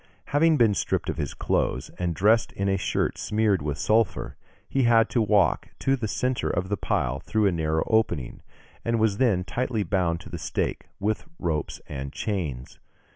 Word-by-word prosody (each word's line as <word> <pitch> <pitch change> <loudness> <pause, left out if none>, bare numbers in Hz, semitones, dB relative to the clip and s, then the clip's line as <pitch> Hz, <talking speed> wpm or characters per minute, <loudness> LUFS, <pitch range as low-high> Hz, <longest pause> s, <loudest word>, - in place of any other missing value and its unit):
Having 155 +2 +4
been 115 -5 +4
stripped - - -1
of - - -8
his - - -3
clothes, - - -1
and 85 -2 -1
dressed 110 +5 +3
in 100 - -2
a 95 - +2
shirt 95 - -1
smeared 105 -4 +1
with 75 -1 -2
sulphur, 105 - +1 0.3
he 135 - 0
had 115 -1 +4
to 120 - +2
walk 105 -2 +3
to 135 - +1
the 120 -4 -3
centre 125 +4 -1
of 90 +2 -1
the 100 - +1
pile 70 -7 -1
through 110 +8 0
a 100 - +4
narrow 80 -2 0
opening, 110 - 0 0.4
and 115 -1 0
was 110 -2 +2
then 105 -8 +2
tightly 120 +2 -1
bound 90 -2 0
to - - -11
the 85 - -5
stake 70 - -2
with 105 +6 -1
ropes 80 -4 -2
and 70 -1 -5
chains. 75 - -4
100 Hz, 180 wpm, -26 LUFS, 85-110 Hz, 0.4 s, Having